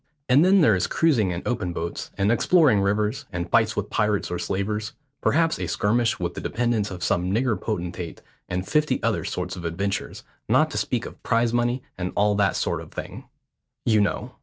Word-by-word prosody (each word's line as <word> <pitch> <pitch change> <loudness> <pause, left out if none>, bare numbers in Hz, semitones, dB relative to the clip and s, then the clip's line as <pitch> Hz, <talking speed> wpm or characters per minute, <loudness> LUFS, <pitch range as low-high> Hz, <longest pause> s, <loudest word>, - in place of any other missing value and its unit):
And 135 +5 +5
then 190 +1 +5
there 115 -9 +5
is 90 -2 +1
cruising 130 - +2
in 90 0 -4
open 90 -8 -2
boats, 85 0 -4
and 100 +2 +2
exploring 130 - +4
rivers, 105 +2 0
and 90 -2 -3
fights 110 -1 +3
with 105 0 -3
pirates 105 -3 0
or 90 - -2
slavers; 105 +2 -2 0.3
perhaps 165 +1 +2
a - - -2
skirmish 115 +3 +1
with - - -3
the - - -6
dependents 115 -3 0
of 90 -1 -7
some 90 +1 +1
nigger 115 +2 +1
potentate, 90 -4 -4 0.3
and 90 +1 -3
fifty 150 -4 +1
other 115 -2 +1
sorts 90 0 -4
of 90 - -8
adventures, 95 +4 -3 0.3
not - - +4
to - - -1
speak - - -1
of - - -10
prize 115 0 +1
money 120 +1 0 0.2
and 90 0 -3
all 105 +1 +3
that 100 -1 +2
sort - - -1
of - - -12
thing, - - -7 0.6
you 110 -2 +4
know. 100 - -1
105 Hz, 195 wpm, -24 LUFS, 95-120 Hz, 0.6 s, And